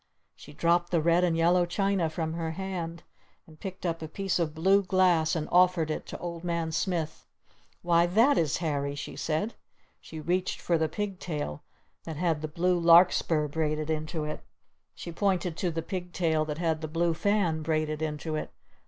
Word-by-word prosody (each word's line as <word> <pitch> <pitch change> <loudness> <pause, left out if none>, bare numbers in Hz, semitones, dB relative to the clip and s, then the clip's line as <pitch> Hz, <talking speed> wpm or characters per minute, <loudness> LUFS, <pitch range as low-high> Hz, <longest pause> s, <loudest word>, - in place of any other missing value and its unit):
she 150 - -13
dropped 170 +3 +1
the 170 - +2
red 170 +3 +3
and 170 -2 +2
yellow 175 +2 +4
china 190 -1 0
from 160 0 -3
her 165 -1 -3
hand 170 -2 -5 0.4
and 155 -1 -17
picked 185 -1 -7
up 165 -1 -1
a 160 - -4
piece 195 +3 -2
of 160 -2 -1
blue 190 +5 +4
glass 180 -4 +2
and 155 -2 -2
offered 180 -3 +4
it - - -4
to - - -6
Old 170 -1 -6
Man 170 -2 -1
Smith. 165 -2 -2 0.6
"Why, 170 0 +4
that 230 +10 +4
is 155 - +1
Harry!" 145 -4 -2
she 145 - -6
said. 160 +8 -2 0.5
She 160 - -9
reached 180 +4 -1
for 170 -2 +1
the 160 -1 +1
pig 200 +2 -4
tail 150 - -4 0.4
that 160 -3 -6
had 165 -2 0
the 155 - -3
blue 175 +3 +1
Larkspur 170 -2 +5
braided 155 0 -1
into 155 0 -2
it. 150 0 -5 0.5
She 170 - -7
pointed 180 -2 0
to 180 - 0
the 165 -1 -3
pig 180 -1 -5
tail 160 -3 +1
that 150 -1 -4
had 160 -2 0
the 155 - -3
blue 165 +2 +1
fan 175 -2 +1
braided 155 -1 -1
into 155 0 -3
it. 155 - -3
165 Hz, 190 wpm, -28 LUFS, 155-180 Hz, 0.6 s, Larkspur